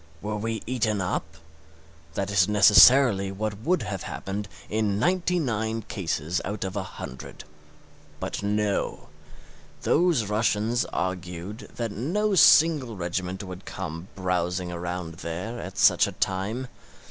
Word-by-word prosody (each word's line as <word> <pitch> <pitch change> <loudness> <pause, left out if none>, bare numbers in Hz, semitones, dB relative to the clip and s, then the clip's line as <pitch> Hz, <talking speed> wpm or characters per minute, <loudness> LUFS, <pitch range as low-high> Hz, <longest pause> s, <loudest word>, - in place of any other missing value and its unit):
We 105 +4 -4
were 110 +1 -2
eaten 110 -4 0
up? 90 -4 -3 0.8
That 100 0 -2
is 95 -2 +4
necessarily 105 0 +6
what 105 +1 -4
would 165 +5 0
have 100 -3 -4
happened 100 +2 -5 0.2
in 105 -2 0
ninety 180 - +1
nine 110 -6 -1
cases 85 -4 -2
out 105 +1 -4
of 95 0 -4
a 100 - -1
hundred. 65 -8 -9 0.8
But - - -4
no; 105 0 -1 0.7
those 165 -8 +3
Russians 110 +2 +1
argued 90 +3 -5
that 115 -2 -3
no 185 - -1
single 150 - +5
regiment 90 +2 -3
would 95 0 -9
come 85 -1 -6
browsing 90 -1 -1
around 85 -1 -5
there 95 +8 -5
at 90 +2 -8
such - - +5
a - - -6
time. 100 +7 -2
105 Hz, 130 wpm, -26 LUFS, 90-115 Hz, 0.8 s, necessarily